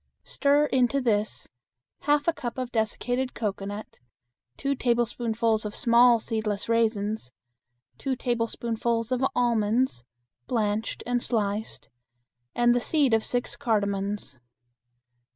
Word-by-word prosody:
Stir 285 +1 +2
into 260 -1 +2
this 215 -4 -1 0.5
half 290 +1 +1
a 335 - +4
cup 240 -5 -5
of 255 -1 -3
dessicated 245 +3 -1
cocoanut, 205 -1 -4 0.6
two 280 0 0
tablespoonfuls 235 -3 0
of 210 -1 -5
small 235 -1 +5
seedless 215 -3 -2
raisins, 220 - 0 0.7
two 270 -2 -1
tablespoonfuls 235 -1 -1
of 255 0 0
almonds 235 - +1 0.4
(blanched 215 -2 -1
and 245 0 0
sliced), 215 -2 -2 0.7
and 240 0 +4
the 245 - +2
seed 280 -1 +2
of 225 -1 +3
six 245 0 -2
cardamons. 200 - -1
230 Hz, 110 wpm, -26 LUFS, 215-245 Hz, 0.7 s, small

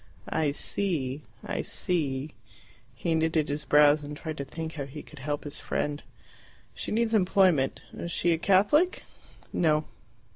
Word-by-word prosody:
"I 155 -3 +1
see. 145 -4 -1 0.2
I - - -2
see." 145 -5 -1 0.6
He 170 - -1
knitted 160 -1 +1
his 145 +1 -2
brows 150 0 +6
and 145 0 -6
tried 155 0 -5
to 140 - -3
think 160 +2 -6
how 145 -3 -4
he 145 +2 -9
could 150 - -14
help 145 +2 -3
his 145 - -5
friend. 145 0 -2 0.7
"She - - -5
needs 230 +1 +1
employment. 185 -8 +3
Is 170 - -5
she 170 0 +2
a 160 - -1
Catholic?" 205 - +3 0.5
"No." 155 -2 +2
155 Hz, 150 wpm, -28 LUFS, 145-175 Hz, 0.7 s, brows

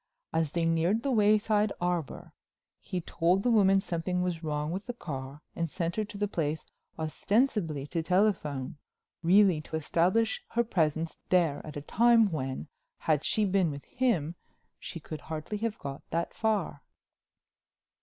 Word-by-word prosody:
As 160 -2 0
they 170 -1 +1
neared 165 +7 +2
the 275 - 0
Wayside 210 -1 +3
Arbor 175 -4 -2 0.5
he 180 - -4
told 175 +4 +1
the 245 - +3
woman 195 -3 +5
something 180 -1 -2
was 175 -2 -2
wrong 150 0 -2
with 195 +6 -4
the 245 - -4
car 140 - -7
and 165 -1 -1
sent 170 +1 -2
her 215 - 0
to 205 - -9
the 205 +1 0
place 160 -5 -2 0.3
ostensibly 165 - 0
to 165 +3 -2
telephone, 165 -8 0 0.4
really 180 -1 +5
to 155 - -7
establish 180 +8 +1
her 235 +1 +3
presence 160 -6 0
there 170 -6 +3
at 150 -1 -8
a - - -4
time 225 +5 +4
when, 135 -1 -3 0.3
had 155 -2 +1
she 215 - +2
been 190 -3 +2
with 140 -1 -7
him, 200 - 0 0.5
she 170 - -7
could 155 -1 -7
hardly 160 +8 -5
have 225 0 -2
got 140 0 -6
that 170 +1 -2
far." 210 -10 -1
170 Hz, 155 wpm, -29 LUFS, 155-205 Hz, 0.5 s, woman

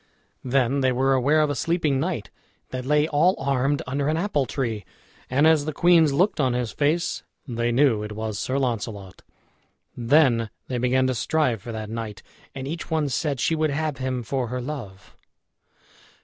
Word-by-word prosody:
Then 130 +1 +1
they 130 -1 +3
were 135 +2 +2
aware 140 +4 +3
of 150 -1 +1
a - - -2
sleeping 155 -3 0
knight, 155 - -3 0.4
that 130 0 -5
lay 150 +1 +3
all 165 +5 +3
armed 135 +1 0
under 140 +2 -2
an 155 - +1
apple 165 -7 0
tree; 115 -6 -3 0.5
and 140 +4 +3
as 160 -2 +4
the 155 - -3
queens 165 -1 +5
looked 180 +8 +1
on 130 -4 +2
his 120 -3 -2
face, 155 +4 0 0.3
they 120 -1 -1
knew 120 -3 +3
it 105 0 -5
was 110 -1 -4
Sir 130 - -1
Launcelot. 110 -7 -3 0.7
Then 120 -2 +3 0.2
they 125 -2 -2
began 130 +1 +2
to 130 - +1
strive 125 -2 0
for 120 - -7
that 110 -1 -5
knight, 110 -3 -6 0.3
and 135 0 -5
each 165 +4 -5
one 155 -3 0
said 140 +1 -1
she 165 - +1
would 155 -1 +1
have 150 0 -2
him 130 -1 -2
for 125 +2 -2
her 125 +2 -3
love. 120 -8 -7
135 Hz, 180 wpm, -24 LUFS, 120-150 Hz, 0.7 s, queens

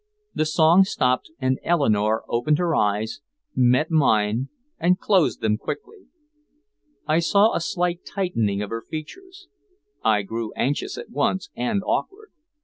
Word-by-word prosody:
The 155 - 0
song 160 +4 +5
stopped 130 -9 0
and 130 -1 0
Eleanore 110 -10 +1
opened 120 +6 +1
her 170 -2 0
eyes, 105 +5 0 0.3
met 125 +6 +3
mine, 115 -5 +2 0.3
and 180 +2 +3
closed 190 -4 +1
them 105 0 +1
quickly. 430 -2 -7 1.0
I 155 +2 +2
saw 200 +6 +3
a - - 0
slight 175 0 -1
tightening 115 - -1
of 105 - -7
her 115 0 -3
features. 370 - -9 0.6
I 105 -2 +3
grew 110 +2 -5
anxious 140 +3 -2
at - - -9
once 180 +6 -1
and 155 +12 -1
awkward. 425 +2 -3
150 Hz, 140 wpm, -23 LUFS, 115-180 Hz, 1.0 s, song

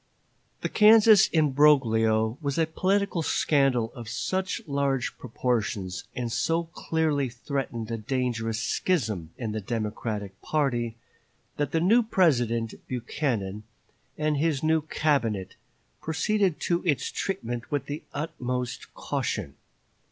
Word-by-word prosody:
The - - -1
Kansas 215 -1 +7
imbroglio 125 -8 +3
was 140 -1 -2
a 165 - +3
political 190 +2 0
scandal 135 -7 +2
of 115 -2 -8
such 190 +7 -2
large 140 -3 -1
proportions, 110 -6 -2
and 120 -2 -3
so 165 +7 +1
clearly 160 -4 -1
threatened 120 -2 -4
a 115 - -1
dangerous 115 -1 -2
schism 110 - -1
in 115 -4 -3
the 110 0 -3
Democratic 105 -2 -4
party, 120 -7 0 0.6
that 145 - -1
the 165 - +2
new 220 +8 +5
President, 120 - +2
Buchanan, 115 -5 -2 0.6
and 150 -1 0
his 155 -1 0
new 160 0 +3
Cabinet, 135 -11 0 0.5
proceeded 190 +2 0
to 170 0 +1
its 155 -7 0
treatment 120 - -3
with 145 -2 -1
the 145 +2 -5
utmost 125 -5 -4
caution. - - -3
135 Hz, 115 wpm, -27 LUFS, 115-160 Hz, 0.6 s, Kansas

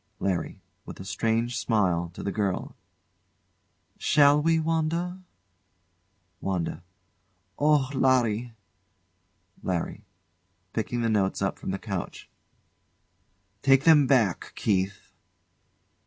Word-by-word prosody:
LARRY. 95 -3 -2 0.2
[With - - -10
a 95 - -8
strange 115 +4 -1
smile 90 -7 +1
to - - -7
the 100 - -2
girl] 100 -3 -2 1.2
Shall 145 0 +5
we, 165 +1 +3
Wanda? 165 +3 -1 1.2
WANDA. 90 -3 -3 0.8
Oh, 145 -2 +3
Larry! 125 -3 +1 1.1
LARRY. 90 -3 -3 0.7
[Picking 120 +2 -2
the - - +2
notes 100 -3 +1
up 100 - -2
from - - -6
the 95 - -1
couch] 95 -3 -6 1.3
Take 135 0 +4
them 150 -4 +6
back, 115 -9 +1
Keith. 95 -1 -1
115 Hz, 95 wpm, -26 LUFS, 95-145 Hz, 1.3 s, them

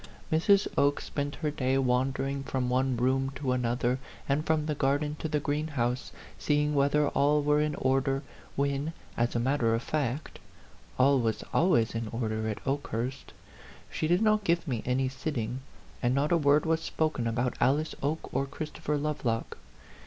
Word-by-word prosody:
Mrs. 195 +5 +4
Oke 145 0 +3
spent 145 0 -4
her 150 - +1
day 135 -2 0
wandering 135 +2 0
from 130 -2 -2
one 130 0 +1
room 130 +2 +1
to 130 -1 -2
another, 125 0 0 0.3
and 145 +2 +1
from 155 -1 +1
the 155 - 0
garden 145 +1 0
to - - -2
the 150 -1 +1
greenhouse, 145 -4 -1 0.3
seeing 150 0 +1
whether 145 +1 +3
all 145 +1 +2
were 150 +1 +3
in 150 0 0
or 135 +1 +2
der, 135 +1 -1 0.3
when, 140 +3 -1 0.2
as 120 0 0
a - - +2
matter 120 -2 +2
of 115 - -3
fact, 145 -1 -2 0.6
all 135 +1 +5
was 115 -2 -1
always 120 -10 +3
in 115 0 -3
order 110 -1 -2
at 105 - -6
Okehurst. 135 -1 -3 0.6
She 155 - -1
did 175 +6 +3
not 215 -1 +3
give 170 -2 +1
me 120 -5 -1
any 130 +1 +1
sitting, 130 -3 -3 0.4
and 125 +1 +2
not 140 +2 +1
a - - +5
word 145 0 +3
was 160 0 +1
spoken 155 -8 -1
about 120 +2 0
Alice 145 +5 +2
Oke 150 +3 -2
or 135 - 0
Christopher 150 +1 -3
Lovelock. 140 -6 -2
140 Hz, 170 wpm, -29 LUFS, 125-150 Hz, 0.6 s, all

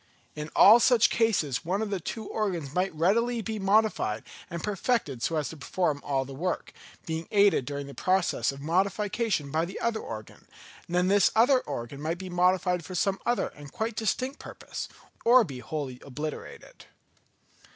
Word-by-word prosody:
In 150 0 -5
all 220 +4 +9
such 235 -2 +4
cases 160 - +1
one 185 +4 -1
of 215 -1 -2
the 195 - -1
two 220 +6 -5
organs 175 -10 -3
might 185 +2 +1
readily 230 +8 +1
be 220 0 -4
modified 195 - +2 0.3
and 170 -1 -5
perfected 205 - -1
so 165 - 0
as 150 -2 -1
to 160 - -9
perform 150 +1 -1
all 135 -2 0
the 135 - -9
work, 175 +6 -3 0.3
being 160 0 -4
aided 200 -10 +4
during 140 0 -4
the 140 - -10
progress 185 -2 +1
of 135 0 -10
modification 190 0 0
by 160 +2 +1
the 180 +3 -5
other 230 -1 0
organ; 110 - -9 0.4
and 175 - -4
then 180 +1 +3
this 200 +1 +5
other 250 +4 +5
organ 120 - -6
might 160 +3 -2
be 185 0 -7
modified 180 0 +2
for 185 +3 -7
some 195 +2 +1
other 240 0 +1
and 145 -1 -13
quite 220 0 -2
distinct 255 +6 -1
purpose, - - -7 0.3
or 245 +1 +7
be 135 -10 -7
wholly 135 -3 -5
obliterated. 150 +3 -7
180 Hz, 175 wpm, -28 LUFS, 150-215 Hz, 0.4 s, all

